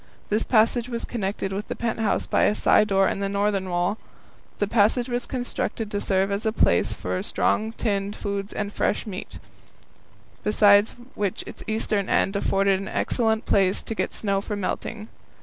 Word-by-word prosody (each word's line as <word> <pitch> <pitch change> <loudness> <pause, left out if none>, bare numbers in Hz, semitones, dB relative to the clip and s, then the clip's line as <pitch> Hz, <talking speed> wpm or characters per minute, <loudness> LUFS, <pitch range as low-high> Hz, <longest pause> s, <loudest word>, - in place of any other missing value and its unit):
This 215 +2 +1
passage 230 +1 +2
was 235 -1 -3
connected 195 -3 -3
with 205 +3 -4
the - - -4
pent 230 -1 -2
house 220 -2 0
by - - +2
a 210 - +2
side 215 - +4
door 195 -1 +3
in - - -2
the 200 0 -1
northern 200 -1 0
wall. 180 +4 0 0.6
The 205 - +1
passage 230 +3 +2
was 245 -1 -3
constructed 245 -3 -3
to 205 - -2
serve 195 0 +1
as 200 +2 -1
a 220 - +1
place 85 - +2
for 90 0 -3
storing 220 +1 0
tinned 200 -3 -2
foods 200 0 -4
and 205 -1 -4
fresh - - 0
meat, 195 -3 -7 1.1
besides 205 0 +5 0.2
which 200 -3 -2
its - - -9
eastern 215 -2 0
end 195 - +2
afforded 195 -1 +2
an 195 - -6
excellent 220 -2 0
place 195 -1 +2
to - - -3
get - - -2
snow 200 -2 -1
for 210 +1 -4
melting. 210 +2 -4
205 Hz, 180 wpm, -24 LUFS, 195-220 Hz, 1.1 s, besides